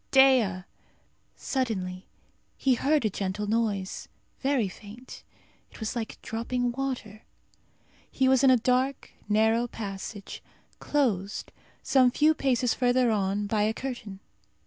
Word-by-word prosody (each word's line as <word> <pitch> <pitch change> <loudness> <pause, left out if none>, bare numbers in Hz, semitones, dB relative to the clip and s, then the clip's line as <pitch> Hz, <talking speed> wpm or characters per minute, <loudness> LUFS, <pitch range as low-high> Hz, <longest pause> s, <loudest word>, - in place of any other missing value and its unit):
Dea!" 255 -9 +5 0.7
Suddenly 190 -8 -3 0.5
he 265 - +3
heard 280 +2 +2
a - - +3
gentle 195 +2 -3
noise, 210 -3 -1 0.3
very 270 -6 +1
faint. 215 +6 -11 0.5
It - - -15
was 220 +1 -3
like 225 -2 -4
dropping 245 +2 -2
water. 245 -5 -4 0.9
He 265 - +1
was 260 0 +4
in 270 - +7
a 255 - +6
dark 255 +3 0 0.2
narrow 220 +3 +3
passage, 200 -2 -7 0.4
closed, 215 -9 -1 0.3
some 260 -2 +4
few 305 +5 +3
paces 255 -5 +1
further 245 -1 +2
on, 200 0 0
by 210 +1 0
a 215 +1 +1
curtain. 220 -7 -6
230 Hz, 125 wpm, -27 LUFS, 205-260 Hz, 0.9 s, in